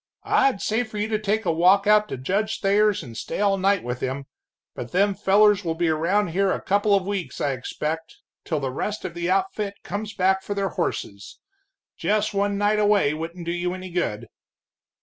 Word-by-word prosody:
"I'd 265 -7 +2
say 220 +3 +1
for 220 -2 -9
you 210 +1 -1
to 215 -1 0
take 215 +1 -1
a 170 - +2
walk 185 +5 +4
out 210 0 +4
to - - -4
Judge 200 - -1
Thayer's 205 -1 +2
and 120 -5 -10
stay - - -5
all 200 -1 +3
night 195 +1 +2
with 125 0 -4
him, 135 +1 -3 0.5
but 120 - -8
them 200 +2 +3
fellers 205 +1 +4
will 165 -2 -2
be 170 0 +1
around 175 +5 +1
here 190 +3 +1
a - - -1
couple 205 +1 +2
of 195 -2 0
weeks, 195 -3 -4
I 145 - 0
expect 155 +5 -4 0.3
till 155 - -2
the 135 -2 -3
rest 210 +10 -4
of 170 - -4
the 175 +1 -3
outfit 195 +2 0
comes 210 +1 -5
back 190 +1 +2
for 205 +1 -5
their 195 -1 0
horses. 100 - -4 0.6
Just 210 0 0
one 200 0 0
night 205 +1 +2
away 205 -8 +3
wouldn't 165 +2 -6
do 170 - -2
you 175 +1 -2
any 185 -1 -8
good." 120 -10 -2
195 Hz, 205 wpm, -24 LUFS, 165-205 Hz, 0.6 s, walk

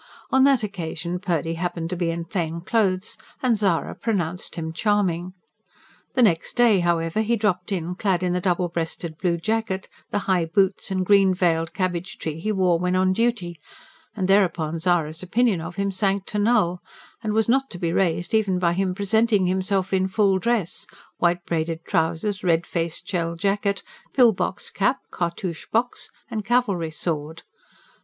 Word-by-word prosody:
On 265 0 +5
that 270 -4 +4
occasion 175 -3 -4
Purdy 165 -3 -1
happened 170 0 -3
to - - -1
be 175 -1 -1
in 165 0 -3
plain 170 -1 -3
clothes, 190 -1 0 0.2
and 245 -3 +3
Zara 195 -5 0
pronounced 180 -6 -2
him 160 -2 -4
charming. 185 -2 0 0.8
The 255 - +4
next 170 -7 +2
day, 235 -5 +5
however, 170 +2 +1
he 225 +2 +1
dropped 200 -4 -1
in 180 -2 -2
clad 185 -1 0
in 180 -1 +1
the 180 - 0
double 180 -1 +1
breasted 165 -1 -4
blue 175 -2 +1
jacket, 215 +1 -2 0.2
the - - -1
high 180 -3 +2
boots 190 +4 +1
and 185 -1 -1
green 195 -1 +5
veiled 165 -2 +1
cabbage 180 -1 -2
tree 160 0 -4
he 215 +6 -1
wore 185 -4 +2
when 180 +1 0
on 185 0 +3
duty; 190 -7 -1 0.6
and 190 -4 -1
thereupon 170 -5 +2
Zara's 165 -2 0
opinion 205 0 +1
of 165 +2 -7
him 200 0 -1
sank 195 0 0
to 210 - -1
null, 190 -5 +2 0.4
and 215 -2 -2
was 220 -1 +2
not 270 +3 +2
to 175 - -7
be 170 -1 -1
raised 175 -1 0
even 205 -4 +2
by 170 -1 +2
him 185 0 0
presenting 210 0 +2
himself 190 +1 0
in 190 0 +2
full 195 -1 +2
dress: 230 -5 -1 0.3
white 175 0 +1
braided 165 0 -2
trousers, 180 +3 0
red 170 -1 +2
faced 165 -1 -3
shell 170 -2 -1
jacket, 200 +2 0 0.3
pill 245 -4 +6
box 185 - -3
cap, 200 +7 +1
cartouche 170 0 -3
box 240 +2 -1 0.2
and 215 -1 -4
cavalry 205 -7 +1
sword. 160 0 -4
185 Hz, 170 wpm, -24 LUFS, 170-205 Hz, 0.8 s, pill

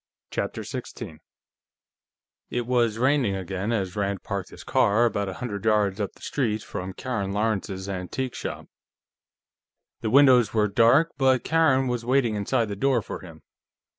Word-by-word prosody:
CHAPTER - - -3
16 80 - -7 1.3
It 120 -1 -2
was 120 -3 +1
raining 130 -4 +2
again 95 +3 -3
as 100 -4 -1
Rand 100 -2 -2
parked 100 -2 -4
his - - -12
car 120 -3 +3
about 100 -4 -1
a - - -5
hundred 105 -5 -5
yards 105 -2 +2
up 100 - -3
the - - -19
street 110 -6 -1
from 95 +1 -6
Karen 100 -6 -3
Lawrence's 100 -3 -2
antique 100 +7 -4
shop. - - -6 1.3
The 110 - -2
windows 125 -4 +5
were 105 -1 +3
dark, 120 +11 +4
but 130 -2 +3
Karen 140 -5 +3
was 120 -1 -2
waiting 125 -2 +2
inside 105 +3 0
the 100 - -3
door 125 +1 +1
for - - -6
him. 80 -4 -13
110 Hz, 155 wpm, -25 LUFS, 100-125 Hz, 1.3 s, windows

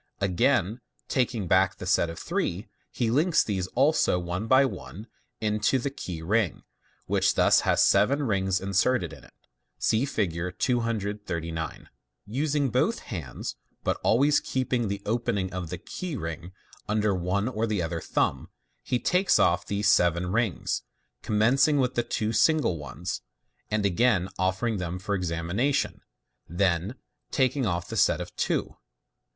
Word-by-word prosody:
Again 100 +3 +1 0.3
taking 120 -6 0
back 95 +2 +3
the - - -7
set 90 -2 +2
of 85 - -7
three, 95 +7 -2 0.2
he 115 -3 -1
links 155 +7 +3
these 95 -4 -2
also 140 - +3
one 90 +4 -3
by 130 +3 +6
one 110 -5 -7 0.3
into 105 +3 +1
the 135 +2 -2
key 90 - -6
ring, 105 0 0 0.4
which - - +2
thus - - +5
has - - +3
seven 140 +2 +3
rings 95 -5 +1
inserted 100 +7 +1
in - - -13
it. - - -18 0.4
(See 110 - +1
Fig. 90 -8 -2
239.) 105 - -2 0.4
Using 140 +3 0
both 195 - +2 0.2
hands, 70 -10 -5 0.3
but - - 0
always 140 +6 +4
keeping 125 -3 -1
the 100 0 -4
open 115 0 0
ing 95 -2 -2
of 90 -3 -4
the 90 - -4
key 170 - -6
ring 85 -2 -5 0.4
under 105 -1 +2
one 95 +3 -1
or 115 -2 -1
the 105 -5 0
other 80 0 -3
thumb, - - -1 0.3
he 125 - -1
now - - -11
takes 185 +2 +3
off 90 +1 +2
these 105 +1 0
seven 90 -2 +3
rings, 115 -4 0 0.4
commencing 130 +8 +3
with 130 -2 +1
the 120 - +1
two 110 -1 -2
single 150 - +3
ones, 75 -1 -5 0.5
and 105 -1 0
again 100 -1 +2
offering 95 +5 0
them 90 -1 -3
for 95 +3 -3
examination 90 +9 -1 0.5
5 85 - -10
then 95 +3 +1 0.3
taking 130 -1 +1
off 85 -1 -2
the - - -6
set - - +3
of - - -7
two. - - -1
105 Hz, 155 wpm, -27 LUFS, 90-125 Hz, 0.5 s, by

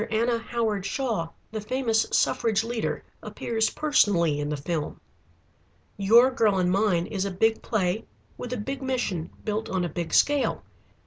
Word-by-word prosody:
Anna 230 +2 +1
Howard 225 -4 -2
Shaw, 220 -6 -1 0.2
the 215 -1 -4
famous 225 0 0
suffrage 220 -2 +2
leader, 230 -1 -3 0.2
appears 225 -1 -1
personally 190 - +2
in 145 0 -2
the 150 - -2
film. 150 +1 -3 1.0
"'Your 230 +6 +5
Girl 220 -6 +2
and 180 -1 +2
Mine' 190 -3 +2
is 195 -1 -3
a 200 - -1
big 220 +4 +1
play 200 -1 -1 0.3
with 245 - -7
a 250 - -2
big 270 +6 -4
mission 245 -11 -2 0.2
built 215 0 -2
on 185 -2 0
a - - -3
big 165 +1 -4
scale. 290 -1 +2
215 Hz, 155 wpm, -26 LUFS, 180-235 Hz, 1.0 s, Your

